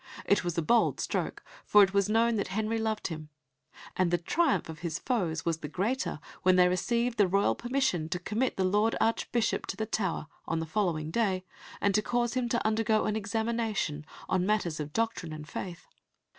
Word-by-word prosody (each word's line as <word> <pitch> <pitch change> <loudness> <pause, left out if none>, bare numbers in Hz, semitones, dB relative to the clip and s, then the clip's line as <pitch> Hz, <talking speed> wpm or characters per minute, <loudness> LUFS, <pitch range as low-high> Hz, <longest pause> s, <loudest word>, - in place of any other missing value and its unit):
It 200 - +3
was 175 -1 -3
a 170 - +1
bold 235 +8 +3
stroke, - - -2 0.2
for 210 -1 +6
it 195 0 +1
was 200 0 +2
known 230 +2 +3
that 200 - -1
Henry 220 +4 -1
loved 220 -2 -1
him, 155 -2 -7 0.7
and 185 -2 +2
the 175 - +2
triumph 195 - +1
of 160 -1 -8
his 165 -1 -3
foes 180 -12 -1
was 165 -1 0
the 150 - -5
greater 200 - -1 0.2
when 185 0 +4
they 180 -1 +6
received 235 +6 0
the 200 - +6
royal 195 +2 +2
permission 240 - -1
to 180 - -1
commit 215 +8 -1
the 190 - +1
Lord 210 +4 +2
Archbishop 230 0 0
to 195 - -4
the 220 - -1
Tower 195 -7 -1 0.2
on 165 - -1
the 165 - -2
following 160 -4 -1
day, 190 -3 0 0.3
and 200 - +2
to 215 - +3
cause 240 +1 0
him 250 -2 -1
to 235 -1 0
undergo 220 0 +2
an 215 - 0
examination 220 -7 -1 0.2
on 180 - +1
matters 185 -6 0
of 150 0 -4
doctrine 225 -6 -1
and 155 -1 -8
faith. 175 +3 -6
200 Hz, 200 wpm, -29 LUFS, 170-225 Hz, 0.7 s, for